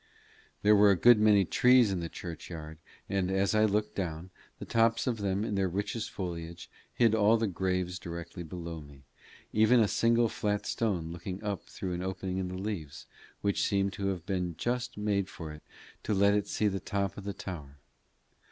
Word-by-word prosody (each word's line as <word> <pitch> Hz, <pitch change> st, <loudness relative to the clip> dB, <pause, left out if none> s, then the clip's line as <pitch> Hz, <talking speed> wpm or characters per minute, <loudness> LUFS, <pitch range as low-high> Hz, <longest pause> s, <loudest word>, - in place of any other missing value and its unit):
There 105 Hz, +1 st, +6 dB
were 105 Hz, 0 st, +6 dB
a 100 Hz, -, +5 dB
good 120 Hz, +4 st, +6 dB
many 105 Hz, -2 st, +5 dB
trees 125 Hz, +2 st, +5 dB
in 95 Hz, -, -1 dB
the 85 Hz, -1 st, -4 dB
church 85 Hz, -1 st, -8 dB
yard, 80 Hz, -2 st, -8 dB, 0.3 s
and 95 Hz, -2 st, 0 dB
as 95 Hz, +2 st, +1 dB
I 110 Hz, 0 st, +4 dB
looked 105 Hz, 0 st, 0 dB
down, 90 Hz, -1 st, -4 dB, 0.3 s
the -, -, -7 dB
tops 115 Hz, 0 st, +2 dB
of 120 Hz, -4 st, -1 dB
them 100 Hz, 0 st, 0 dB
in 105 Hz, -, -3 dB
their 95 Hz, -1 st, +1 dB
richest 105 Hz, +4 st, -3 dB
foliage 85 Hz, -2 st, -6 dB, 0.2 s
hid 115 Hz, -2 st, +3 dB
all 110 Hz, +1 st, +4 dB
the 115 Hz, -, 0 dB
graves 90 Hz, -1 st, -1 dB
directly 85 Hz, 0 st, -7 dB
below 85 Hz, -1 st, -6 dB
me, 70 Hz, -2 st, -15 dB, 0.5 s
except 110 Hz, +3 st, +5 dB
a 110 Hz, -, +4 dB
single 115 Hz, +2 st, +3 dB
flat 105 Hz, -1 st, -2 dB
stone 90 Hz, -8 st, -1 dB
looking 90 Hz, +3 st, -6 dB
up 100 Hz, -2 st, -3 dB
through 95 Hz, -2 st, -5 dB
an 90 Hz, -, -3 dB
opening 95 Hz, 0 st, -3 dB
in 95 Hz, -, -2 dB
the 90 Hz, 0 st, -5 dB
leaves, 90 Hz, -8 st, -5 dB, 0.4 s
which 100 Hz, -1 st, 0 dB
seemed 100 Hz, 0 st, +1 dB
to 100 Hz, 0 st, -3 dB
have 90 Hz, -4 st, -3 dB
been 90 Hz, -3 st, -2 dB
just 120 Hz, -1 st, -2 dB
made 100 Hz, -2 st, 0 dB
for 80 Hz, -5 st, -8 dB
it 75 Hz, 0 st, -10 dB, 0.4 s
to 105 Hz, -, -1 dB
let 100 Hz, +1 st, +4 dB
it 105 Hz, -1 st, 0 dB
see 105 Hz, -, 0 dB
the 95 Hz, -1 st, -1 dB
top 100 Hz, 0 st, -2 dB
of 100 Hz, -, -8 dB
the 100 Hz, -, -3 dB
tower. 75 Hz, -9 st, -8 dB
95 Hz, 200 wpm, -30 LUFS, 90-105 Hz, 0.5 s, There